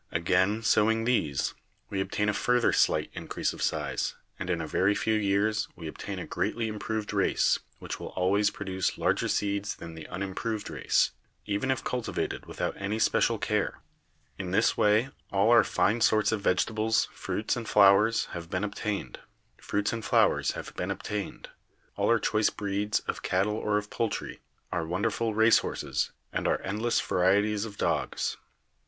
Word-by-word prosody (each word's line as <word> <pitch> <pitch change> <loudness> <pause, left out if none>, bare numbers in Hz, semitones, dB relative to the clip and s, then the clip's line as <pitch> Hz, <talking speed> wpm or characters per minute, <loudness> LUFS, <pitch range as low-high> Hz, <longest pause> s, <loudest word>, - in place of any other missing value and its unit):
Again 95 +6 +1
sowing 110 +1 +3
these, 80 - 0 0.4
we 95 -1 0
ob - - -3
tain 105 - 0
a 105 - +2
further 125 +3 +2
slight - - +2
increase - - -3
of - - -9
size, - - -1 0.2
and 95 - -4
in 85 -2 0
a 80 - -3
very 95 +6 +2
few 110 - 0
years 105 +1 +1
we 85 -3 -7
obtain 80 - -6
a - - -5
greatly 115 -1 -1
improved 110 0 -3
race, 100 -2 +2 0.2
which - - -6
will - - -6
always 100 +3 +3
produce 95 -3 -2
larger - - +1
seeds 100 0 -1
than 85 - -9
the 80 -1 -9
unimproved 100 +4 -4
race, - - +2 0.3
even 105 +6 -1
if 130 - 0
cultivated 125 -2 -3
without - - -3
any 100 +2 -2
special 110 - +2
care. - - -1 0.6
In 95 -2 -4
this 100 +5 +3
way 105 +5 +3 0.2
all 100 +3 +3
our 115 -2 +7
fine 110 +4 +1
sorts 110 -2 +4
of 110 -2 -1
vegetables, 110 +4 +1
fruits 110 - -2
and 120 -2 -5
flowers 105 +2 +5
have 85 -1 -6
been 90 +2 -2
obtained, 105 - -3 2.8
all - - 0
our 115 0 +4
choice 105 +1 +2
breeds 105 +1 -1
of - - -4
cattle 95 +3 +1
or 105 -1 0
of 105 0 -4
poultry, 115 -2 -3 0.3
our 85 - -1
wonderful 105 +6 -1
race 110 +1 +6
horses - - -2 0.2
and - - -1
our - - +2
endless 110 +4 0
varieties 100 +3 +2
of 105 -2 -9
dogs. - - -1
105 Hz, 155 wpm, -28 LUFS, 95-110 Hz, 2.8 s, our